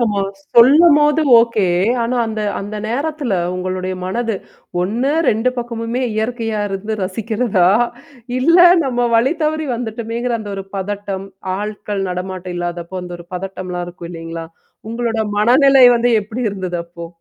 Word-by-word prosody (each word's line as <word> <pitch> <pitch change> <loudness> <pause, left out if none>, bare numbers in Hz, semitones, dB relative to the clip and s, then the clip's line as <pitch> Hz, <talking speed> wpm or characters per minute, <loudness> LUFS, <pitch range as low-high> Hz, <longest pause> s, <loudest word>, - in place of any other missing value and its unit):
நம்ம 210 -4 +1 0.3
சொல்லும்போது 295 +4 +6 0.2
ஓகே. 230 -4 +2 0.4
ஆனா 245 +2 -1
அந்த, 220 -1 -4 0.2
அந்த 205 +2 -6
நேரத்தில 280 +1 -2 0.2
உங்களுடைய 185 0 -3
மனது 225 +4 -2 0.5
ஒன்னு 235 +9 0 0.2
2 225 +3 +2
பக்கமுமே 235 +1 -3
இயற்கையா 225 -1 -2
இருக்கிறத 205 +3 -4
ரசிக்கிறதா! 205 -1 +1 0.7
இல்ல 335 +7 +4 0.3
நம்ம 245 -2 0
வழி 255 +6 +3
தவறி 310 0 0
வந்துட்டோமேங்கிற 235 +1 -3
அந்த 210 -2 -7
ஒரு 195 - -5
பதட்டம், 195 0 -4 0.3
ஆட்கள் 210 -1 -4
நடமாட்டம் 180 0 -5
இல்லாதப்போ 175 +1 -4
அந்த 175 0 -8
ஒரு 170 - -12
பதட்டம்லாம் 180 -1 -5
இருக்கும் 175 -1 -9
இல்லீங்களா! 165 -1 -7 0.4
உங்களோட 230 -1 -2 0.2
மனநிலை 265 +4 +6
வந்து 240 +1 +2
எப்பிடி 225 +4 -5
இருந்தது 185 -3 -4
அப்போ? 170 0 -9
220 Hz, 130 wpm, -18 LUFS, 185-240 Hz, 0.7 s, சொல்லும்போது